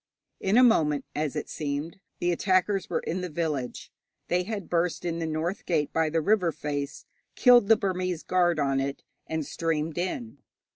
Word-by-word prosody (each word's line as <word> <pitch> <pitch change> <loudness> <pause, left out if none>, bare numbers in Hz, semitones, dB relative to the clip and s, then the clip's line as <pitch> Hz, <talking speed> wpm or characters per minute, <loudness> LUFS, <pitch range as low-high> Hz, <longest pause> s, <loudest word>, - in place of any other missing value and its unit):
In 195 +4 +2
a 255 - +8
moment, 150 - +3
as 150 0 -2
it 150 - -3
seemed, 150 +4 -4 0.2
the 175 - +1
attackers 185 +2 +1
were - - 0
in 180 +3 -3
the 180 - -4
village. 150 -6 -3 0.4
They 180 +1 +2
had 200 +1 -5
burst 175 0 0
in 170 -1 -2
the 165 - -2
north 160 +4 -2
gate 155 -4 0
by 160 -1 +2
the 165 +1 +1
river 185 -1 +2
face, 145 0 -4 0.3
killed 245 -4 +6
the 225 0 +6
Burmese 185 -3 -2
guard 175 -2 +2
on 135 -2 +1
it, 140 +1 -3 0.2
and 160 -2 -2
streamed 160 +1 -2
in. 225 +6 -4
170 Hz, 180 wpm, -27 LUFS, 150-185 Hz, 0.4 s, a